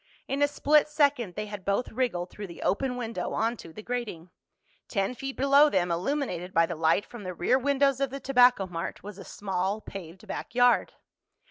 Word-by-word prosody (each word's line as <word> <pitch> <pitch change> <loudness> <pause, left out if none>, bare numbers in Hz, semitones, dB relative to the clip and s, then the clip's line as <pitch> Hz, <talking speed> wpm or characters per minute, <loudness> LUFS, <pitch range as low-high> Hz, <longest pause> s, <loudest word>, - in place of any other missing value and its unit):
In 275 +1 -2
a 290 - +5
split 295 +1 +3
second 285 - +1
they 210 - -3
had 205 -2 -8
both 200 +6 -1
wriggled 220 -8 -1
through 205 -1 -7
the 170 - -9
open 250 +4 0
window 230 -2 -4
onto 225 -6 -2
the 215 +6 -10
grating. 215 -9 -5 0.6
Ten 195 +1 -1
feet 270 +1 -6
below 280 +3 +6
them, 180 -7 +1
illuminated 180 - -2
by 165 0 +5
the 170 - -4
light 160 +5 +2
from 240 - -10
the 185 -1 -5
rear 250 +10 +2
windows 275 0 +2
of 275 -1 0
the 275 +2 -6
Tobacco 250 -5 +4
Mart, 175 -1 -5
was 205 0 -9
a - - -8
small 195 +1 -2
paved 185 -4 -10
back - - -6
yard. 245 0 +4
220 Hz, 195 wpm, -28 LUFS, 185-270 Hz, 0.6 s, below